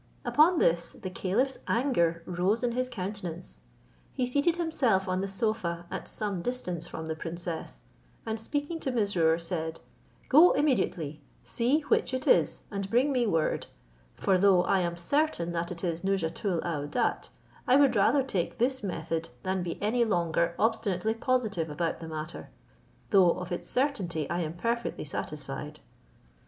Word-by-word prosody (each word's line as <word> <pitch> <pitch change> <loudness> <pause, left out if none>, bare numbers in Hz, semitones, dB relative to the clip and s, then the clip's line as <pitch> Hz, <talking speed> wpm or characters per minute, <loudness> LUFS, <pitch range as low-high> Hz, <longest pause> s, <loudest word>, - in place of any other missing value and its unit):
Upon 330 +4 +5
this 170 - +2
the 185 - -7
caliph's 230 +9 0
anger 170 -10 +1
rose 185 +7 0
in 245 - +1
his 255 +1 -1
countenance. 185 -5 -6 0.5
He 255 - -1
seated 285 +7 +2
himself 265 - +1
on 185 0 0
the 195 - -2
sofa 190 -4 -2
at - - -5
some 200 -4 -3
distance 180 -8 -2
from 160 - -6
the 160 - -2
princess, 165 +1 -5 0.4
and 220 0 -2
speaking 290 +7 -3
to 270 - -2
Mesrour, 190 -9 +2
said, 165 -1 -3 0.5
"Go 315 +6 +7
immediately, 175 - 0 0.2
see 255 +7 +1
which 285 -2 +1
it 260 - -3
is, - - +3
and 200 -1 -3
bring 250 +7 +3
me 250 -3 +2
word; 165 -6 0 0.5
for 190 -2 +2
though 190 -2 +5
I 195 - +2
am 170 -1 -1
certain 175 - 0
that 170 0 -2
it 170 0 -7
is 170 -2 -1
Nouzhatoul 190 -1 0
aouadat, 150 -3 -1 0.4
I 255 - +6
would 275 -3 +5
rather 265 +7 +4
take 190 -10 -2
this 260 +2 +1
method 165 - -3
than 190 0 -1
be 175 -1 -4
any 235 +3 +2
longer 170 -4 +1
obstinately 220 -2 +1
positive 225 -9 0
about 165 +2 -2
the 165 - -7
matter, 155 +1 -6 0.6
though 185 -5 +6
of 180 0 -6
its 175 - -4
certainty 190 - 0
I 175 - 0
am 160 -2 -2
perfectly 235 +2 -2
satisfied." 150 +1 -5
190 Hz, 155 wpm, -29 LUFS, 170-245 Hz, 0.6 s, Go